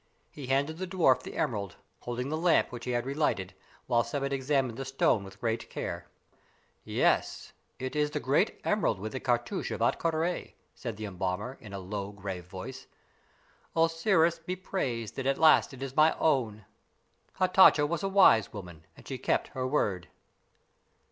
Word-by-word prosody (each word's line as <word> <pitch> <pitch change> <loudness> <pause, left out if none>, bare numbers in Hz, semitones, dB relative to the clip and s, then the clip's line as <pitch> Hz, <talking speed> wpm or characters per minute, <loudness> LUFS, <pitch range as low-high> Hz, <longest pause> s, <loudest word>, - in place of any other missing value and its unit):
He 140 -4 -8
handed 140 +5 0
the 185 - -3
dwarf 175 -9 +3
the - - -8
emerald, 105 - -2 0.2
holding 125 +2 -4
the 155 - -1
lamp, 165 -2 +3
which 120 -1 -7
he - - -4
had 120 0 -1
relighted, 135 -9 -1 0.3
while 120 -1 +3
Sebbet 140 +3 -3
examined 135 -3 0
the - - -2
stone 130 -5 +1
with 95 0 -12
great 115 -1 -2
care. - - -5 0.8
"Yes; - - 0 0.2
it 130 +3 -5
is 150 0 +2
the 150 - -3
great 145 - +1
emerald 210 - +1
with 110 +3 -5
the 130 - -4
cartouche 120 -1 -1
of - - -4
Ahtka 165 - +1
Rā," 165 +3 -2 0.2
said 115 -5 -6
the 110 - -5
embalmer, 95 +5 -3
in 105 - -11
a 100 - -5
low, 100 +1 -5
grave 95 -3 -6
voice. 130 +9 -8 0.9
"Osiris 165 +1 +3
be 180 +3 -4
praised 125 - -3
that 135 -1 -2
at 135 - +2
last 160 -1 +5
it 135 0 -8
is 135 -1 -6
my 155 +1 +4
own! 115 -9 0 0.7
Hatatcha 185 -5 +6
was 170 0 -2
a 195 - -1
wise 185 - +5
woman, 85 -6 -10
and - - -15
she - - -5
kept - - 0
her 130 -1 -3
word." 100 -10 0
130 Hz, 175 wpm, -29 LUFS, 110-155 Hz, 0.9 s, Hatatcha